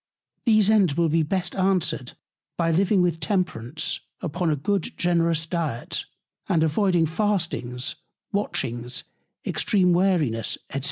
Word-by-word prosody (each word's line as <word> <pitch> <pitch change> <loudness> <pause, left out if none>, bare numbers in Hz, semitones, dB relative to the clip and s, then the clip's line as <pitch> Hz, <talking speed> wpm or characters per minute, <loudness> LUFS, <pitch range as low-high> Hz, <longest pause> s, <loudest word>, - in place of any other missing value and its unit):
These 215 -3 +5
Ends 190 -9 +3
will 170 -1 +3
be 165 +2 +3
best 175 +3 -1
answered 175 -8 0 0.4
by 165 -1 +2
living 190 +2 +3
with 170 -2 0
Temperance 180 - -1 0.2
upon 165 +3 -1
a 155 - +2
good 190 +6 -1
generous 170 -2 +2
Diet, 160 -8 -2 0.4
and 160 - +3
avoiding 175 +1 +2
Fastings, 160 - -1 0.3
Watchings, 120 - -2 0.4
extreme 185 -4 +2
Weariness, 165 - +1 0.2
&c. 135 - -1
170 Hz, 120 wpm, -24 LUFS, 150-190 Hz, 0.4 s, These